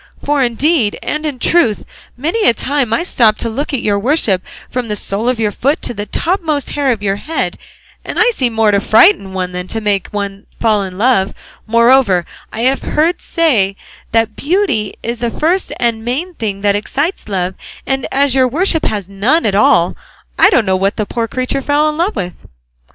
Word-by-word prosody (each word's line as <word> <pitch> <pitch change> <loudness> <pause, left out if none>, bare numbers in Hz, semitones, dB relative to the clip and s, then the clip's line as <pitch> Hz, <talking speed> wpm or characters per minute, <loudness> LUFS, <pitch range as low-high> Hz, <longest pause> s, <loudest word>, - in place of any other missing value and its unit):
For 290 -1 +1
indeed 250 -1 +1
and 305 +1 -2
in 285 -4 -4
truth 245 -6 +2 0.3
many 335 - 0
a 235 - +1
time 275 -3 -1
I 230 - +1
stop 225 - +3
to 230 - -3
look 280 +7 -3
at 270 -5 -2
your 205 -1 +1
worship 225 - +1 0.3
from 250 -2 -3
the 210 - -2
sole 205 +4 -2
of 250 -2 -1
your 215 -2 +1
foot 280 +8 0
to - - -2
the 205 -1 -5
topmost 325 -5 -1
hair 285 -2 +1
of 215 -4 -3
your 195 -1 0
head, 315 +9 -3 0.5
and - - -6
I 475 +2 +4
see 260 - 0
more 225 -2 +2
to 200 - +3
frighten 220 - +4
one 180 -1 -2
than 180 0 -5
to 225 - -3
make 205 -3 0
one 200 -1 -5
fall 215 -3 +2
in 185 -2 -6
love; 210 -3 +2 0.3
moreover 230 -5 +4 0.3
I 225 - -5
have 260 +3 +1
heard 330 +4 0
say 230 - +1 0.4
that 225 -1 +1
beauty 290 - 0
is 235 0 -3
the 240 0 -1
first 340 +10 0
and 230 -2 0
main 290 +10 -3
thing 205 -8 -4
that 200 0 +2
excites 280 - -2
love, 185 -2 -1 0.3
and 270 -1 -1
as 275 -1 +2
your 260 -1 +4
worship 320 +4 0
has 205 -4 -2
none 215 +12 +1
at 205 - +1
all, 180 -4 +3 0.4
I - - +6
don't 235 - +3
know 190 -1 +2
what 195 +2 0
the 215 - 0
poor 230 +3 -2
creature 255 +4 -2
fell 290 +2 +2
in 305 - -4
love 375 +5 0
with." 180 -1 -3
235 Hz, 200 wpm, -15 LUFS, 205-290 Hz, 0.5 s, I